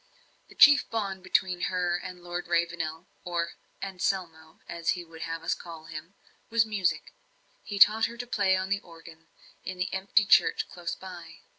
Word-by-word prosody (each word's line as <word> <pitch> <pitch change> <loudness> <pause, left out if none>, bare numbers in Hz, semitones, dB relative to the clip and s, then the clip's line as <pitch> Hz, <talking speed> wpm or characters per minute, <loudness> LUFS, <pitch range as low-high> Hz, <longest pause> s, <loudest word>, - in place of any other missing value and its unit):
The - - -16
chief 285 -2 +7
bond 195 -4 -3
between 185 -1 +1
her 180 -1 0
and 180 0 -7
Lord 175 0 -5
Ravenel 170 -1 -1 0.2
or 170 -1 -2 0.3
"Anselmo," 180 -4 -3
as 170 -1 -4
he 175 - -6
would 165 -1 -13
have 165 0 -4
us - - +1
call 165 -2 -10
him 160 +5 -9 0.3
was 230 0 +3
music. 205 -5 -1 0.5
He 205 - -5
taught 215 +3 +7
her 235 +1 -6
to 245 - -5
play 200 -5 +2
on 190 0 -3
the 200 - +2
organ, 165 -2 -15 0.4
in 185 0 -6
the 180 - -2
empty 195 +2 +2
church 445 - +4
close 175 -1 -5
by. 175 -3 -11
180 Hz, 170 wpm, -28 LUFS, 170-195 Hz, 0.5 s, chief